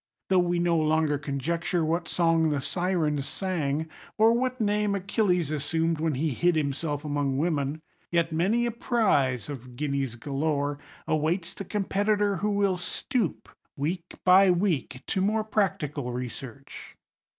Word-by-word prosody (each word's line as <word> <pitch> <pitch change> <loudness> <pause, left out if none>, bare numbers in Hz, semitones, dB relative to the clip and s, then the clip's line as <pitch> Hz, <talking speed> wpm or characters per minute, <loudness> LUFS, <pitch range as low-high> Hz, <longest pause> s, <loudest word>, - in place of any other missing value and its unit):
Though 190 -1 +5
we 175 0 +1
no 170 -1 +2
longer 155 -2 +2
conjecture 165 +4 -1
what 165 +3 -1
song 165 -2 +2
the 145 -2 0
Sirens 155 -3 0
sang, 160 -5 -2 0.3
or 225 +1 +6
what 255 +1 -1
name 210 -1 +1
Achilles 185 -4 +1
assumed 160 +2 0
when 160 -2 0
he 150 +3 0
hid 175 +7 +2
himself 145 0 -2
among 145 -2 0
women, 150 -1 -1 0.3
yet 170 -1 +1
many 195 +9 +2
a 240 - 0
prize 195 - +1
(of 125 -4 -8
guineas 140 -3 -2
galore) 145 +2 -1 0.3
awaits 165 +3 0
the 195 - -7
competitor 205 0 +1
who 210 +5 0
will 200 -2 +1
stoop, 220 - -2 0.3
week 165 +5 -3
by 190 +1 +7
week, 170 -8 0
to 190 - -1
more 215 +3 +1
practical 155 - -1
research. 125 +2 -8
165 Hz, 140 wpm, -27 LUFS, 145-190 Hz, 0.3 s, by